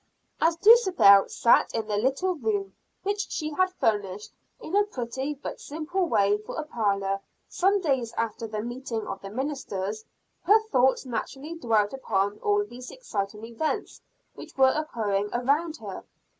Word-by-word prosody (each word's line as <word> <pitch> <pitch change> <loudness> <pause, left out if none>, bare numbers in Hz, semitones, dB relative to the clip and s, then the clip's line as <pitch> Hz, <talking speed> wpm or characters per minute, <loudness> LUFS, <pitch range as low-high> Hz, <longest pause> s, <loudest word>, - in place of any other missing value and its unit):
As 330 0 +3
Dulcibel 370 - +6
sat 235 - +3
in 225 -1 -1
the 210 -1 -2
little 270 - +1
room 210 - -2 0.3
which 410 +2 -2
she 310 -1 -3
had 370 +5 +1
furnished 210 - -1 0.3
in 350 - -5
a 410 - +6
pretty 265 - -4
but 280 - -7
simple 325 +5 -2
way 205 -7 +2
for 215 - -8
a - - -2
parlor, 200 -8 -1 0.3
some 390 +2 +2
days 265 -8 0
after 230 0 -2
the 215 -1 -4
meeting 240 -2 -4
of 195 0 -6
the 195 - -7
ministers, 220 -5 -4 0.4
her 430 +2 +5
thoughts 260 - +3
naturally 270 +6 -5
dwelt 225 -9 +1
upon 205 -6 -1
all 410 0 +1
these 250 -8 -10
exciting 210 - -5
events 235 +7 -3 0.3
which - - -12
were 265 -1 +6
occurring 210 -10 -1
around 290 +7 0
her. - - -8
245 Hz, 155 wpm, -26 LUFS, 210-315 Hz, 0.4 s, Dulcibel